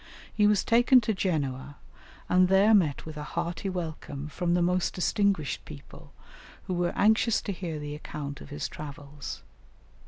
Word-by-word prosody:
He 210 -1 +4
was 210 -1 +3
taken 240 +2 +5
to 220 0 0
Genoa, 145 -7 -2 0.5
and 180 0 +4
there 195 +4 +5
met 165 -9 +2
with 155 -1 -8
a 150 - -4
hearty 175 +3 -2
welcome 155 -5 -5
from 175 +3 0
the 175 - +2
most 180 +1 +1
distinguished 190 -4 0
people, 75 - -12 0.5
who 185 - -4
were 175 0 0
anxious 220 +2 +3
to 205 - -3
hear 175 -4 -4
the 145 0 -5
account 145 -1 -6
of - - -11
his 145 0 -4
travels. 145 -1 -8
175 Hz, 160 wpm, -28 LUFS, 145-195 Hz, 0.5 s, taken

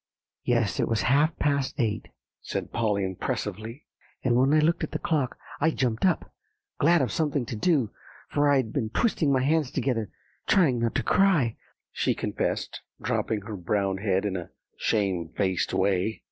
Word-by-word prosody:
"Yes, 115 -5 +1
it - - +2
was 115 -1 0
half 145 +5 +3
past 140 -2 0
eight," 110 -3 -1 0.3
said - - -4
Polly 105 -3 0
impressively. 110 - -4 0.4
"And 120 -2 +2
when 130 +3 +4
I 155 - +5
looked 165 +3 +2
at - - -4
the - - 0
clock, 145 -6 -1 0.2
I 160 - +3
jumped 125 +1 +1
up, 180 - -1 0.5
glad 170 0 +4
of 120 - -1
something 145 -3 0
to 120 - -5
do; 135 - +2 0.4
for 145 0 +2
I'd 130 -6 +2
been 115 -6 -1
twisting 160 - +1
my 130 -2 +2
hands 150 -1 +2
together, 115 -8 -1 0.4
trying 145 -11 +4
not 115 -1 -1
to - - +1
cry," 170 - +3 0.4
she - - 0
confessed, - - -2 0.2
drooping 110 -2 -1
her 105 +1 -6
brown 95 +1 -1
head 95 -1 +1
in 100 -2 -1
a 90 -3 -5 0.3
shamedfaced 95 -2 0
way. 100 +3 +1
120 Hz, 165 wpm, -27 LUFS, 105-145 Hz, 0.5 s, I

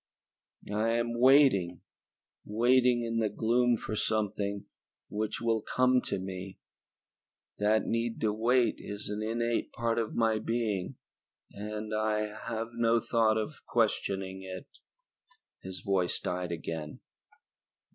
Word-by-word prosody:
"I 110 +2 +1
am 120 0 0
waiting, 125 - +5 0.6
waiting 120 +2 +3
in 115 0 -1
the 110 -2 +1
gloom 120 +3 +2
for 110 - -4
something 105 -2 -1 0.5
which 105 0 -2
will 115 -1 +1
come 125 +3 +2
to - - -1
me. 95 0 -6 1.0
That 105 +1 +3
need 115 0 -1
to 110 -2 +2
wait 120 +3 +2
is 105 0 -6
an 105 +1 -3
innate 115 +1 -1
part 115 -1 0
of 115 - -3
my 110 -2 +2
being 110 -5 -2 0.6
and 105 +1 -5
I 105 0 0
have 115 0 -4
no 115 0 +3
thought 110 -1 +2
of 110 +7 -4
questioning 95 -4 0
it." 95 -1 -7 1.0
His 95 -1 -7
voice 95 -2 0
died 90 -1 -3
again. 80 -2 -5
110 Hz, 125 wpm, -30 LUFS, 100-115 Hz, 1.0 s, waiting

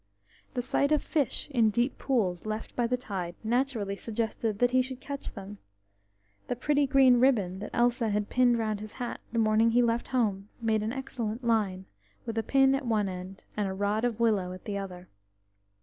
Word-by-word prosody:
The 245 - -1
sight 280 +3 +1
of 300 - +3
fish 290 -6 -1
in 240 -5 +3
the 215 - +4
deep 240 +4 0
pools 210 -8 0
left 215 +1 -4
by 240 -1 +1
the 250 +1 0
tide 185 -7 -5
naturally 230 -4 0
suggested 220 0 -2
that 245 +2 +3
he 255 0 +4
should 255 0 -5
catch 280 0 -6
them; 200 0 -8 0.9
the 245 - -1
pretty 285 +3 +1
green 260 -2 +6
ribbon 205 -8 +2
that 210 - -6
Elsa 240 -1 +2
had 210 0 0
pinned 245 -1 +3
round 215 -2 -1
his 215 0 -8
hat 245 -2 -5
the 230 - -3
morning 220 0 +4
he 240 +2 +4
left 235 0 0
home 210 -6 0
made 220 -2 +1
an 215 +1 -2
excellent 245 -3 -4
line, 205 -5 +1 0.4
with 225 - -4
a - - +2
pin 270 +3 +4
at 270 -2 -1
one 215 -3 +1
end, 185 +1 -7
and 210 -1 0
a 190 - -3
rod 205 +3 0
of 235 -2 0
willow 210 -6 +2
at 185 - -11
the 205 - -3
other. 185 -2 -6
225 Hz, 200 wpm, -29 LUFS, 205-250 Hz, 0.9 s, green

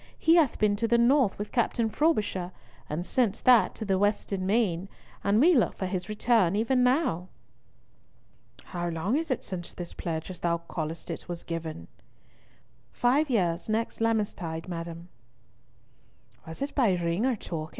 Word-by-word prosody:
He 330 +2 +4
hath 305 -7 +3
been 210 -1 +2
to 230 +2 0
the 235 +1 +3
North 240 -2 +3
with 205 +1 -5
Captain 235 -1 +1
Frobisher, 210 - 0 0.4
and 160 +4 -3
since 230 -3 +1
that 250 -3 +5
to 220 - -5
the 190 -2 +1
Western 200 -2 0
Main, 195 -4 +1 0.3
and 200 +2 +3
we 340 +7 +6
look 245 -8 +2
for 190 - -2
his 185 +1 -3
return 215 -4 +2
even 250 +4 +2
now." 250 - +1 1.4
"How 175 -1 -4
long 170 +8 -1
is 320 +1 -1
it 255 - -1
since 175 -2 -7
this 175 -1 -7
pledge, 165 +1 -4
as 180 - -10
thou 170 -1 +1
callest 165 -1 -5
it, - - -7
was 175 -1 -5
given?" 160 - -5 1.0
"Five 275 +5 +2
years 175 -6 0
next 225 +1 -1
Lammas 225 -2 +1
tide, 165 -1 -6
madam." 170 0 -6 1.4
"Was 160 +11 -5
it 285 - -4
by 235 -9 +3
ring 175 +7 0
or 260 - +1
token?" 160 -6 -6
200 Hz, 165 wpm, -28 LUFS, 170-235 Hz, 1.4 s, we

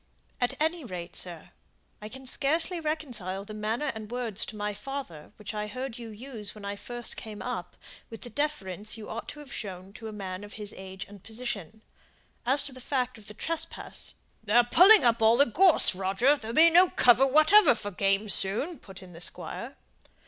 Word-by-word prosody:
"At 245 - 0
any 320 +1 0
rate, 180 -7 -7
sir! 175 -1 -2 0.5
I 210 - -7
can 265 +3 -10
scarcely 320 +7 +1
reconcile 245 - -4
the 215 - -9
manner 220 +7 -2
and 215 -2 -8
words 235 -4 -3
to 215 - -8
my 210 0 -3
father, 265 - -7
which 210 0 -8
I 210 0 -3
heard 255 +2 -6
you 230 -1 -8
use 220 -1 -7
when 210 -1 -10
I 200 0 -3
first 240 +3 0
came 215 -2 -8
up, 235 -8 -5 0.3
with 225 - -10
the 240 - -9
deference 215 - -1
you 215 - -9
ought 230 - -6
to 295 - -9
have 275 -2 -11
shown 190 -2 -7
to 225 0 -9
a - - -6
man 190 -2 -6
of 205 - -10
his 210 -1 -5
age 190 0 -8
and 200 -2 -14
position. 220 -3 -6 0.6
As 275 +3 +2
to 280 - -6
the 255 - -11
fact 255 -2 -2
of 210 - -15
the 210 - -8
trespass 330 +8 -2
" - - -40
"They 210 -1 -3
are 240 - +7
pulling 380 - +7
up 235 -1 +3
all 225 +1 +5
the 280 - +6
gorse, 335 - +6
Roger 195 +9 +2
there'll 230 -4 -7
be 330 +1 +7
no 360 +2 +6
cover 250 +2 +5
whatever 310 - +6
for 205 -2 -6
game 195 +2 +1
soon," 215 - +1
put 190 -1 -13
in 180 -1 -13
the 165 - -11
Squire. - - -3
225 Hz, 205 wpm, -28 LUFS, 205-270 Hz, 0.6 s, are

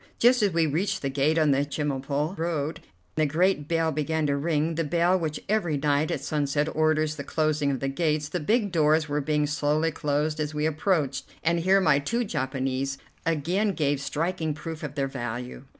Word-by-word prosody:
Just 245 +1 +5
as 205 -2 +3
we 165 -1 +2
reached 160 +6 -1
the 135 - -1
gate 145 +4 +2
on 155 -2 +4
the 140 +1 +3
Chemulpo 145 +2 -2
road 160 -3 -2 0.3
the 155 -1 +1
great 160 0 +1
bell 165 -1 +1
began 155 +1 -1
to 140 -1 +1
ring, 155 +2 0
the 165 +1 -1
bell 170 +4 +2
which 155 -3 -3
every 190 -8 +1
night 145 +1 +1
at 135 - -2
sunset 145 0 0
orders 155 0 +2
the 140 - -4
closing 155 -1 0
of 135 -2 -2
the 135 - 0
gates. 150 +1 0
The 175 +4 -3
big 205 +5 +1
doors 155 -1 +3
were 145 0 -1
being 150 +1 +1
slowly 150 +2 +1
closed 150 0 -1
as 150 0 -2
we 150 +1 0
approached, 155 -4 0 0.2
and 170 +1 +2
here 190 +3 +4
my 150 -7 +4
two 235 +12 -1
Japanese 135 - -2 0.3
again 175 +7 +1
gave 145 -4 0
striking 160 +2 -2
proof 160 0 -7
of 145 -2 -6
their 135 -2 0
value. 125 0 -5
155 Hz, 195 wpm, -26 LUFS, 145-165 Hz, 0.3 s, Just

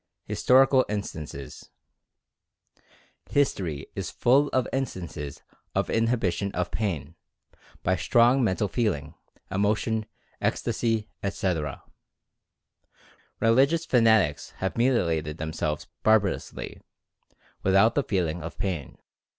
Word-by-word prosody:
HISTORICAL 130 +1 +4
INSTANCES. 80 -9 -6 1.6
History 90 - 0
is - - -3
full 135 +4 +3
of 130 -3 0
instances 85 - -4 0.3
of - - 0
inhibition 110 -5 +1
of 90 -1 -2
pain, 85 - -2 0.7
by 95 - +2
strong 120 +8 +4
mental 105 -1 +1
feeling, 95 - -1 0.4
emotion, 105 +3 0 0.3
ecstasy, 115 -2 0
etc. 90 -7 -2 1.6
Religious 135 +9 +3
fanatics 110 - +3
have 95 - -2
mutilated 85 - +1
themselves 80 -1 -3 0.2
barbarously, 110 -3 0 0.8
with 95 0 +2
out 110 +4 +5
feeling 90 -5 0
the 85 0 -5
pain. 85 -8 -4
100 Hz, 90 wpm, -26 LUFS, 85-115 Hz, 1.6 s, out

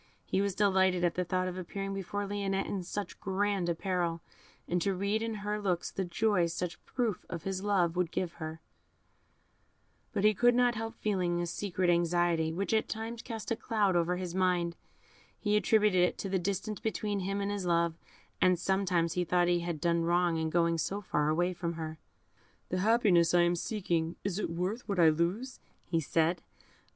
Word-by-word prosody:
He 190 - 0
was 200 -2 -1
delighted 190 -3 +3
at 175 - +2
the 180 - -1
thought 185 +1 -1
of 185 0 -4
appearing 195 +2 -4
before 195 +1 -3
Lionette 195 -1 -1
in 195 - -3
such 200 +3 -5
grand 195 -2 0
apparel, 170 -1 -1 0.4
and 180 0 0
to 195 0 +1
read 200 +3 0
in 225 -1 -2
her 210 0 -1
looks 180 -4 -1
the 195 - -2
joy 180 0 +1
such 170 +1 -4
proof 235 -7 -1
of 170 -3 -5
his 190 -1 -3
love 185 -5 +2
would 180 -2 +1
give 175 0 -2
her; 160 +1 -5 1.5
but 200 - -1
he 215 0 +6
could 240 +4 +4
not 245 0 +4
help 225 +1 -5
feeling 180 -5 0
a 175 - 0
secret 185 +1 -2
anxiety, 170 -1 +2
which 195 +6 -2
at 220 - +1
times 225 +1 -4
cast 225 -2 -6
a - - +3
cloud 210 -5 +1
over 175 +1 +1
his 180 -2 -4
mind; 180 -2 +1 0.6
he 210 -1 +1
attributed 210 -3 +4
it 180 - +2
to 195 - -4
the 190 0 +1
distance 200 +3 -2
between 215 -2 -2
him 195 +2 -2
and 200 0 -1
his 200 -3 -3
love, 170 -1 +2 0.5
and 185 -1 +5
sometimes 180 -3 +1
he 180 - 0
thought 175 0 +2
he 175 0 +3
had 170 -2 -3
done 170 +1 +1
wrong 175 0 +2
in 160 0 -1
going 170 0 +2
so 200 +5 -1
far 150 -6 0
away 175 +4 +1
from 170 -1 -3
her. 160 -1 -6 0.7
"The 185 - -1
happiness 190 -6 +4
I 175 - +6
am 175 0 +2
seeking, 170 -4 -1
is 200 0 -2
it - - -1
worth 185 +9 -3
what 200 -3 0
I 165 -2 +7
lose?" 180 +12 -1 0.4
said 165 +3 +1
he. - - -33
185 Hz, 195 wpm, -31 LUFS, 170-205 Hz, 1.5 s, I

